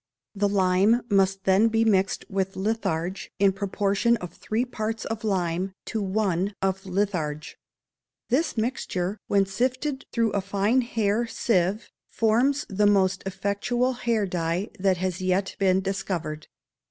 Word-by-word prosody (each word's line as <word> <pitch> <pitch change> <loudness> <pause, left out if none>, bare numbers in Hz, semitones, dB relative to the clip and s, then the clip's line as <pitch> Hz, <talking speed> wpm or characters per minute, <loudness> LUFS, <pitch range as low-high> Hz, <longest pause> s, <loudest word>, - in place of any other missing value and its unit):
The 205 -1 +1
lime 195 +4 +3
must 195 -1 +2
then 195 +3 +4
be 225 0 +2
mixed 195 -3 +2
with 195 -1 -2
litharge 190 -3 -2
in 195 0 +4
the - - -13
proportion 200 +3 +1
of 180 -5 -8
three 225 +6 -2
parts 220 -2 -4
of 225 -1 -4
lime 185 -2 -1
to 220 - -3
one 195 -1 0
of 195 0 -1
litharge. 180 -6 -2 0.7
This 280 +3 +1
mixture, 210 -5 -2
when 200 -1 +3
sifted 255 +7 -2
through 230 -2 +1
a 200 - 0
fine 200 +6 +1
hair 230 -1 0
sieve, 200 -2 0 0.2
forms 245 +6 +2
the 205 +1 +2
most 195 -1 +3
effectual 205 +7 0
hair 235 -4 0
dye 175 +1 -2
that 190 -1 +2
has 185 0 -2
yet 185 +1 0
been 190 -1 +3
discovered. 185 -6 -3
200 Hz, 140 wpm, -25 LUFS, 190-225 Hz, 0.7 s, then